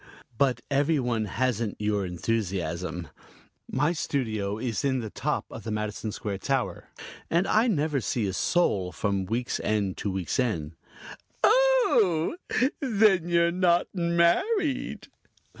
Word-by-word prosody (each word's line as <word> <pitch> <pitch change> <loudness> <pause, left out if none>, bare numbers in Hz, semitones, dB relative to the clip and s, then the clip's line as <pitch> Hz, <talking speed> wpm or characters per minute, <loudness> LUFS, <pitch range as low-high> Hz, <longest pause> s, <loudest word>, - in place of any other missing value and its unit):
"But 130 +1 +1
every 145 +2 +2
one 120 -4 0
hasn't 115 0 -1
your 105 -2 0
enthusiasm. 90 -4 -2 0.6
My 145 +6 +1
studio 110 -10 -2
is 115 -3 -2
in 135 -2 +1
the 110 -3 -5
top - - -2
of - - -8
the 115 - -5
Madison 105 0 -3
Square 100 -2 -4
tower, 135 +1 -2 0.4
and 170 +3 +2
I 220 +4 +3
never 150 - +1
see 115 -1 -1
a 95 - -2
soul 100 - +1
from 100 -1 -1
week's 120 +6 -2
end 100 -3 -1
to 105 - -2
week's 95 +1 -2
end." 85 -11 -1 0.7
"Oh, 335 - +4 0.4
then 210 - +3
you're 170 0 +3
not 175 -1 +2
married." 180 - +1
125 Hz, 130 wpm, -27 LUFS, 105-170 Hz, 0.7 s, Oh